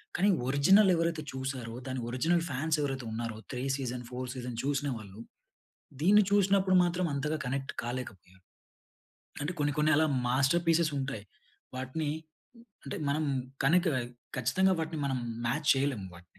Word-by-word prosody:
కానీ 195 +3 +3 0.2
ఒరిజినల్ 185 +9 +5
ఎవరైతే 165 -1 0
చూసారో, 130 -3 -4
దాని 130 0 -3
ఒరిజినల్ 165 +7 +1
ఫాన్స్ 155 +4 0
ఎవరైతే 135 -3 -2
ఉన్నారో, 115 -1 -4
3 125 0 -4
సీజన్, 125 -2 -4
4 125 0 -5
సీజన్ 125 -2 -5
చూసినవాళ్ళు. 125 -8 -3 0.8
దీన్ని 205 +5 +6
చూసినప్పుడు 195 -1 +4
మాత్రం 175 +1 0
అంతగా 150 +3 -1
కనెక్ట్ 135 +2 -3
కాలేకపోయారు. 95 -7 -7 1.0
అంటే 145 +4 -1
కొన్ని 145 0 +1
కొన్ని 150 +1 +3
అలా 160 +1 +4 0.2
మాస్టర్ 135 +7 +2
పీసెస్ 165 -1 +3
ఉంటాయి. 135 -6 -4 0.5
వాటిని 140 +4 -3 0.8
అంటే, 135 - -4
మనం 155 +2 +1 0.4
కనిక 175 +4 +4 0.5
ఖచ్చితంగా 190 +8 +3
వాటిని 160 -1 -4
మనం 135 -2 0 0.3
మాచ్ 150 +5 -1
చేయలేం 135 -5 0
వాటిని. 90 0 -13
140 Hz, 135 wpm, -30 LUFS, 125-165 Hz, 1.0 s, దీన్ని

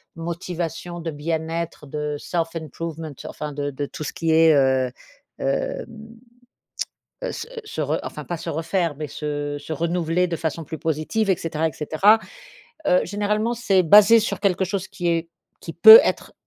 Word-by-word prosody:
motivation, 170 0 -5
de 165 0 -4
bien-être, 160 +1 -4
de 150 +1 -3
self 165 0 -3
improvement, 160 0 -6
enfin 150 -1 -6
de 145 0 -3
de 145 +1 -4
tout 155 - -7
ce - - -5
qui 165 -1 -1
est, 160 0 +6
heu, 130 -2 +2 0.5
hem 135 0 -2 1.4
heu, - - -2
se - - -6 0.2
se 425 - -5
re - - -1
enfin - - -7
pas 175 - -4
se 165 - -6
refaire, 165 0 -1
mais 155 0 -4
se 145 0 -4
se 160 - -6
renouveler 170 +2 0
de 170 - -2
façon 160 0 -3
plus 160 - -6
positive, 160 +8 -1
et 190 - +3
cetera, 160 -1 -1
et - - -4
cetera. 190 +9 +3 0.7
Heu, 180 - +4
généralement, 210 +4 -1
c'est 195 -6 +2
basé 210 +6 +7
sur 220 - -2
quelque 190 -2 +1
chose 190 0 -3
qui 175 - -4
est 165 0 -1 0.3
qui - - -7
peut 440 +1 +11
être - - -2
165 Hz, 170 wpm, -23 LUFS, 155-180 Hz, 1.4 s, peut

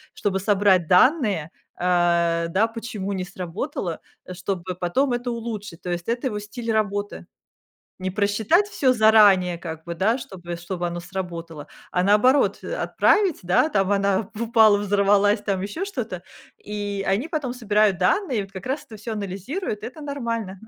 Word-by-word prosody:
чтобы 195 -2 -1
собрать 195 -3 +3
данные, 200 - +3 0.3
а, 170 -1 +2
да, 200 +6 +2
почему 225 -4 -5
не 185 -1 -2
сработало, 180 - -5 0.3
а, 185 - -6
чтобы 185 0 -4
потом 215 +10 0
это 245 +1 -2
улучшить. 220 -7 -6
То 180 - -4
есть 175 0 -4
это 240 +3 -1
его 210 -4 -3
стиль 225 +3 -5
работы. 205 -2 -2 0.7
Не 185 0 -2
просчитать 210 - +2
всё 275 -10 +2
заранее 210 -6 +5
как 160 -2 -7
бы, 170 - -4
да, 210 +8 +2
чтобы 175 -8 -7
чтобы 175 0 -4
оно 175 0 -4
сработало, 170 -4 -6 0.2
а 180 - +1
наоборот, 210 +8 +4
э, - - -5
отправить, 410 - +2
да, 180 - +3
там 195 -7 +1
она 200 0 +1
упала, 220 -3 +5
взорвалась, 205 +1 +3
там, 195 -3 -1
ещё 205 - -4
что-то. 230 - -5 0.4
И 205 -1 -4
они 200 +10 +1
потом 300 -7 -3
собирают 210 -5 +2
данные, 230 - +1
вот 195 - -13
как 190 -1 -9
раз 280 +3 -2
это 220 - -11
всё 220 +2 -5
анализируют, 210 - -4
и - - -3
это 305 +6 -11
нормально. 230 -9 -4
205 Hz, 165 wpm, -23 LUFS, 185-230 Hz, 0.7 s, заранее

